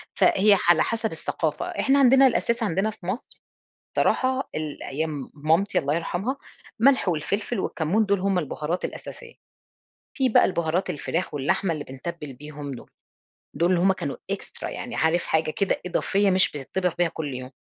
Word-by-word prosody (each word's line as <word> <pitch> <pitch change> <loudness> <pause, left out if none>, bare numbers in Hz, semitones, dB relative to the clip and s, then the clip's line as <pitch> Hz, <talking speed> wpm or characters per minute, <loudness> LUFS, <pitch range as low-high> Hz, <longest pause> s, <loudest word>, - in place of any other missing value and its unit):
فهي 205 +1 +5
ح 175 - +4
على 165 - +4
حسب 225 -1 -1
الثقافة. 160 - -2
إحنا 280 -6 +2
عندنا 270 0 +7
الأساس 235 -1 0
عندنا 200 +2 0
في 195 - -15
مصر 190 +8 -5 0.6
بصراحة 260 +1 +1
ال 155 -2 -4
أيام 150 0 -4
مامتي 160 +7 +2
الله 145 0 0
يرحمها 175 - -2 0.4
ملح 265 -3 +4
والفلفل 200 +7 -1
والكمون، 185 +6 0
دُوُل 200 -1 +1
هُم 195 -1 +1
البهارات 155 +2 -3
الأساسية، 475 -1 -7 0.8
في 265 -4 +3
بقى 220 - +5
البهارات 170 +1 0
الفراخ 165 +1 -3
واللحمة 145 +6 0
اللي 150 -2 -4
بنتبّل 150 +2 -7
بيهم 145 +1 -8
دُوُل، 120 - -12 0.7
دُوُل 175 +2 +2
هُم 190 +2 +4
كانوا 140 -6 -4
إكسترا - - -5
يعني - - -6
عارف 160 +2 +2
حاجة 160 -1 +1
كده 195 +4 -1
إضافية 195 +2 +1
مش 185 0 +3
بتطّبخ 170 +5 -2
بها 175 -1 +3
كل 150 -4 -5
يوم، 130 +1 -7
175 Hz, 160 wpm, -25 LUFS, 155-210 Hz, 0.8 s, عندنا